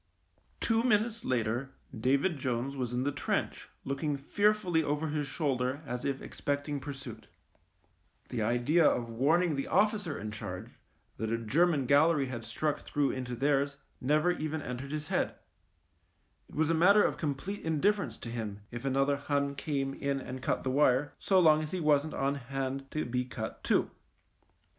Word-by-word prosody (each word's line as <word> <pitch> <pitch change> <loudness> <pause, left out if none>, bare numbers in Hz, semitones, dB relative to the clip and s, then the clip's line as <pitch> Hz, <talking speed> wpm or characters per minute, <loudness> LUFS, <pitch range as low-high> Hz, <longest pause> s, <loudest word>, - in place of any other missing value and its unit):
Two 225 0 +2
minutes 230 -1 +1
later 125 +2 -1 0.2
David 140 +8 +1
Jones 130 +1 -2
was 125 -3 -2
in 125 +1 0
the 145 - +1
trench 140 -2 -2 0.2
looking 140 +2 -1
fearfully 195 +3 +2
over 150 +1 -1
his 150 -1 -1
shoulder 135 -1 -1
as 125 -1 -4
if 135 -1 -2
expecting 145 0 -2
pursuit. 135 -5 -8 1.0
The - - -2
idea 120 +9 +3
of 120 -5 +2
warning 155 +7 +2
the 135 - -2
officer 205 -7 +1
in 105 +1 -5
charge 105 +1 -6 0.5
that 110 0 -2
a 115 - +1
German 145 +6 +2
gallery 145 +2 +4
had 120 -3 -5
struck 145 +7 -1
through 145 -1 0
into 125 -1 -4
theirs 140 +2 +1 0.2
never 150 +6 +3
even 155 -2 -3
entered 125 +3 -5
his 150 -1 -4
head - - 0 1.1
It - - -13
was 160 +1 +2
a - - +3
matter 200 +6 +6
of - - +1
com 145 -3 -1
104 135 - -13
THE 195 - -2
MINE 205 - -6
plete 160 - 0
indifference 200 +6 +1
to 115 - -7
him 110 -3 -5
if 120 +2 -6
another 135 +1 +2
Hun 140 0 0
came 140 -1 -2
in 140 0 -1
and 130 0 -7
cut - - -1
the 130 - 0
wire, 135 0 +3
so 190 -1 +3
long 155 -3 +6
as 155 - -4
he 185 - -3
wasn't 150 -1 +2
on 135 +1 +1
hand 135 0 -4
to 155 - -2
be 125 +1 -1
cut 120 -3 -6
too. - - +2
140 Hz, 175 wpm, -31 LUFS, 125-155 Hz, 1.1 s, matter